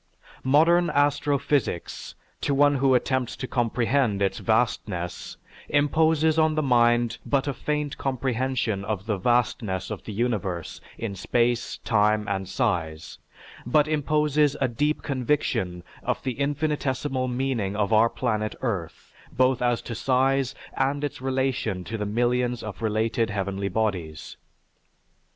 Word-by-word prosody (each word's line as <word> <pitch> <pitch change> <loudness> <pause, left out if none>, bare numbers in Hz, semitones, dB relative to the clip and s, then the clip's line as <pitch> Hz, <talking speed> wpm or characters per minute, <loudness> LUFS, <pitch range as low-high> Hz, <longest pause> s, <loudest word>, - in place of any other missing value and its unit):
Modern 165 +6 +4
astrophysics, 145 - 0 0.3
to 140 - 0
one 145 0 +4
who 135 -1 +3
attempts 130 -1 0
to - - -5
comprehend 120 -2 +1
its 100 -1 0
vastness, 110 -6 -1 0.3
imposes 155 +2 +3
on 155 -1 +3
the 155 - +1
mind 120 -2 +3
but 140 0 0
a 140 - 0
faint 150 +2 -3
comprehension 130 -5 -1
of 100 -2 -3
the 105 -4 -1
vastness 110 -4 0
of - - -5
the - - -6
universe 105 -6 -2 0.2
in 115 -3 -4
space, 120 +5 0
time, 105 -1 +2
and 95 -2 -2
size; 85 - -2 0.4
but 145 +5 +3
imposes 150 -1 +2
a 135 - +2
deep 145 +6 -1
conviction 125 - -1 0.2
of - - -2
the 130 - -1
infinitesimal 140 -2 -1
meaning 125 -6 -1
of 105 0 0
our 110 +2 +5
planet 110 -4 -2
Earth, 95 -10 -4 0.2
both 130 -1 +2
as 120 -1 +1
to 120 - -5
size 130 +2 +1 0.2
and 140 +2 0
its 145 -3 -4
relation 130 -7 -1
to 110 - -6
the 105 -2 -2
millions 120 +2 0
of 110 0 -7
related 110 +1 0
heavenly 100 -1 -2
bodies. 90 -7 -2
125 Hz, 135 wpm, -25 LUFS, 105-140 Hz, 0.4 s, our